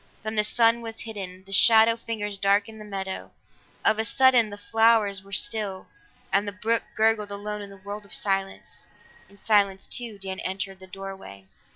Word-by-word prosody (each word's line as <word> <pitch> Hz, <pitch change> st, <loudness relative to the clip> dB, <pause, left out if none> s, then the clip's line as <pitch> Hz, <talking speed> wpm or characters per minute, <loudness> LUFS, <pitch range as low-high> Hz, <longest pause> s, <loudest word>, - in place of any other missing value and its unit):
Then 215 Hz, +1 st, -4 dB
the 210 Hz, -, +3 dB
sun 230 Hz, +2 st, +3 dB
was 225 Hz, -1 st, -5 dB
hidden; 190 Hz, -4 st, -7 dB
the 195 Hz, -, -15 dB
shadow 225 Hz, +3 st, +6 dB
fingers 210 Hz, -3 st, -5 dB
darkened 205 Hz, +2 st, +1 dB
the -, -, -9 dB
meadow; 195 Hz, -2 st, -5 dB, 0.6 s
of 220 Hz, -, +3 dB
a -, -, +2 dB
sudden 250 Hz, -1 st, +4 dB
the 205 Hz, -, -8 dB
flowers 220 Hz, -2 st, +2 dB
were 195 Hz, +1 st, -18 dB
still, 200 Hz, -1 st, 0 dB, 0.4 s
and 200 Hz, +2 st, +2 dB
the -, -, -2 dB
brook 225 Hz, +3 st, 0 dB
gurgled 220 Hz, -1 st, +2 dB
alone 210 Hz, +1 st, -4 dB
in 200 Hz, -1 st, -9 dB
a 195 Hz, -, -12 dB
world 205 Hz, +2 st, -7 dB
of -, -, -18 dB
silence. 195 Hz, -1 st, -2 dB, 0.4 s
In 200 Hz, -, -19 dB
silence 200 Hz, -2 st, +2 dB
too, 235 Hz, -4 st, -2 dB
Dan 190 Hz, -1 st, -6 dB
entered 195 Hz, 0 st, -4 dB
the 190 Hz, -, -12 dB
doorway. 190 Hz, -, -9 dB
205 Hz, 180 wpm, -25 LUFS, 195-220 Hz, 0.6 s, shadow